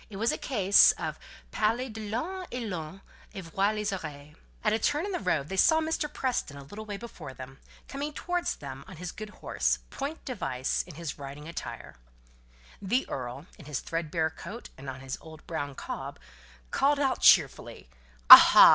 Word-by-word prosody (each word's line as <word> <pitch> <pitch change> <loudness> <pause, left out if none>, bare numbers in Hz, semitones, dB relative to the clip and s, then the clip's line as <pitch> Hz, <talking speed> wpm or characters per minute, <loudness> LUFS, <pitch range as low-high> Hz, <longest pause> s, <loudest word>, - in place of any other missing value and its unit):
It 205 - -10
was 225 +3 +1
a - - -2
case 200 -6 +5
of - - -5 0.3
parler 230 +4 0
de 220 -3 -7
l'ëne 355 - -3
et 250 0 -4
l'on 180 0 -6 0.3
en 195 - -5
voit 195 +5 0
les 210 -1 -2
oreilles. 150 -5 -7 0.3
At - - +2
a 220 - +1
turn 295 - 0
in 405 - -4
the 360 - -2
road 145 - 0
they 190 - -5
saw 315 +11 +5
Mr. 315 -2 -2
Preston 250 - -2
a 140 - -9
little 205 +10 -9
way 205 -1 -4
before 175 - -9
them, 130 +1 -10 0.3
coming 285 +2 -4
towards 355 +3 -2
them 135 -1 -9
on 190 - -10
his 180 +2 -5
good 215 0 -8
horse, - - -1
point 285 +4 -5
device, 135 - -2
in 175 - -11
his 165 -2 -6
riding 140 +2 -8
attire. 170 - -7 0.8
The 240 +7 0
earl, 130 +3 -5
in 155 - -12
his 150 -3 -3
thread 165 -1 -4
bare 160 -1 0
coat, 200 +8 -9
and 135 0 -8
on 130 0 -7
his 135 0 -6
old 160 -1 -13
brown 145 -4 -4
cob, - - -6 0.5
called 285 +1 +3
out 270 -2 0
cheerfully, - - +4 0.4
"Aha! - - +12
190 Hz, 190 wpm, -28 LUFS, 150-245 Hz, 0.8 s, Aha